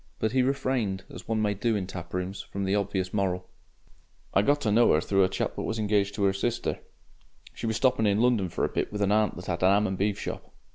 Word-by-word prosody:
But 110 - 0
he 130 +1 +3
refrained, 125 -7 0
as - - -10
one 110 -1 0
may 105 -1 +1
do 110 +3 0
in 100 -3 -1
taprooms, 90 +1 -5
from 100 - -5
the 95 0 0
obvious 95 -2 -1
moral. 90 -3 -1 0.9
"I - - +5
got 145 +7 +2
to 110 - +1
know 115 +3 +5
'er 75 - +4
through 95 +3 +2
a 95 - +2
chap - - -2
what - - -3
was 110 - -2
engaged 105 -2 +1
to 100 - +1
'er 95 - +3
sister. 120 +4 -2 0.7
She - - -5
was 110 - 0
stopping 115 -1 +2
in 100 +1 +2
London 115 -6 +2
for - - -1
a - - -2
bit - - -2
with 105 -1 -1
an 100 - +2
aunt 105 0 +2
that 90 - -9
'ad 85 -1 -2
a 90 - +5
'am 100 +2 +4
an' 95 -1 -2
beef 100 +1 0
shop. - - -6
100 Hz, 250 wpm, -27 LUFS, 95-110 Hz, 0.9 s, I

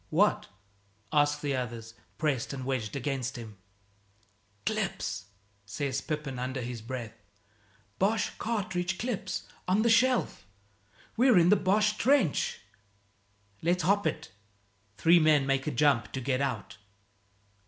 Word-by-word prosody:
"What?" - - +2 0.7
ask 145 0 +3
the 145 -2 -1
others, 115 -3 -5 0.2
pressed 145 -5 -1
and 130 -2 -5
wedged 125 -6 -2
against 135 -1 -2
him. 110 -3 -9 1.1
"Clips!" 95 +2 -2 0.4
says 130 +6 -3
Pepin 150 -5 -4
under 130 +1 -3
his 120 -1 -5
breath, 120 -1 -6 0.9
"Boche 210 +4 +1
cartridge 190 -4 -2
clips 240 -3 -3 0.2
on 195 +4 +3
the 235 - +4
shelf! 250 - +2 0.7
We're 245 -3 +5
in 175 0 +5
the 205 - +7
Boche 210 +2 +2
trench!" 260 - +2 1.0
"Let's 175 +2 +1
hop 205 +2 +2
it." - - -4 0.7
Three 170 +1 +6
men 155 -3 +4
make 135 +1 0
a - - +1
jump 125 -5 +2
to 130 - -2
get 130 +1 -1
out. 115 -7 -3
145 Hz, 125 wpm, -29 LUFS, 125-185 Hz, 1.1 s, the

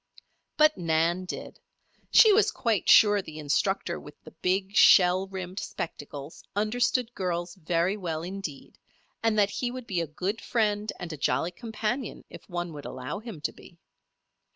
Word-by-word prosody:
But 305 -4 +4
Nan 165 +2 +1
did. - - -7 0.5
She 440 -3 +7
was 420 +2 +4
quite 225 -5 0
sure 205 -1 +7
the 155 -4 -10
instructor 170 +4 0
with 145 - -12
the - - -12
big, 190 +2 -1
shell 185 -1 +6
rimmed 190 0 -6
spectacles, 145 -5 -7
understood 240 +3 +1
girls 175 -3 -3
very 175 +1 0
well 165 -5 -4
indeed, 180 -6 -7 0.4
and 225 -1 +1
that 205 -1 +3
he 245 - -2
would 255 0 -7
be 185 -6 -1
a 165 - -3
good 185 +9 -3
friend 210 -2 0
and 170 -2 -6
a - - -7
jolly 165 +4 0
companion 230 +3 -4
if - - -12
one 175 -2 -4
would 145 -1 -9
allow 130 +9 -5
him 215 -8 -9
to - - -2
be. 170 - -16
190 Hz, 160 wpm, -27 LUFS, 170-215 Hz, 0.5 s, She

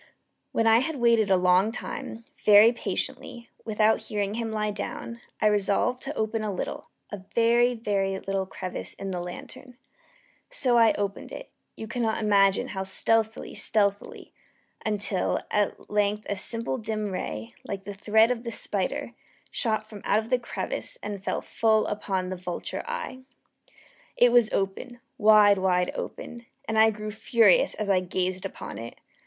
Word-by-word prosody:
When 225 - +1
I 225 0 +6
had 315 +5 -2
waited 235 -4 +3
a 190 - +5
long 180 +3 +3
time, 230 -1 -7 0.2
very 210 +2 +8
patiently, 235 0 -4 0.2
without 220 0 +2
hearing 205 -1 -2
him 225 0 -3
lie 215 -1 -1
down, 235 +3 -6 0.2
I - - 0
resolved 210 +4 +2
to 290 +2 -4
open 220 0 -1
a 210 - -2
little 185 - -5 0.2
a 205 - -4 0.2
very, 235 +1 +4
very 195 -4 -1
little 195 0 -2
crevice 185 -1 -6
in 195 -1 -5
the 180 -1 -3
lantern. 240 +8 -9 0.7
So 265 - +1
I 230 -2 +6
opened 200 -1 -4
it - - -9 0.2
you 220 - -7
cannot 230 -1 -1
imagine 200 -2 +3
how 190 - -4
stealthily, 220 +3 0
stealthily 205 -2 -1 0.5
until, 205 -3 0
at 205 -1 -1
length 210 0 0
a 205 - -1
simple 230 +5 -2
dim 215 -2 -3
ray, 115 - -5
like 195 -1 -5
the 205 - -6
thread 220 +3 +3
of 240 -2 -2
the 235 - -5
spider, - - -3 0.4
shot 215 -3 -1
from 210 -2 -11
out 215 +2 +1
the 250 - +3
crevice - - -4
and 200 -2 -5
fell - - -2
full 220 -1 +2
upon 190 -3 -2
the 185 - -3
vulture 180 -1 -5
eye. 475 - -5 1.0
It 245 0 +6
was 240 -2 +4
open 200 +6 -3 0.2
wide, 210 -2 +6
wide 180 -1 +1
open 235 0 -7 0.2
and 220 0 +1
I 220 0 +7
grew 215 0 -5
furious 230 - +3
as 215 - -3
I 195 -2 +4
gazed 185 +1 -2
upon - - -8
it. 115 +1 -8
215 Hz, 160 wpm, -26 LUFS, 195-230 Hz, 1.0 s, very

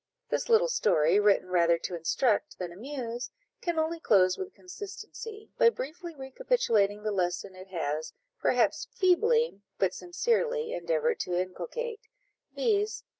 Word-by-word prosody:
This - - -1
little 470 +2 +5
story, 165 - +3
written 205 -3 +3
rather 170 -2 +4
to 175 - -4
instruct 205 +7 +1
than 180 -2 -5
amuse, 240 +3 -5 0.3
can 345 -2 -1
only 320 +1 0
close 185 -10 +4
with 385 0 -7
consistency, 420 +3 -9
by 465 - +8
briefly 335 - -6
recapitulating 260 - +1
the 215 - 0
lesson 185 0 -1
it 185 +1 -11
has, 160 -4 -3 0.3
perhaps - - +2
feebly, 450 - +3 0.2
but 190 - +1
sincerely, 465 +6 0
endeavoured 485 -2 0
to 180 - -2
inculcate, 455 - -4 0.6
viz. 425 -3 +1
290 Hz, 130 wpm, -29 LUFS, -, 0.6 s, by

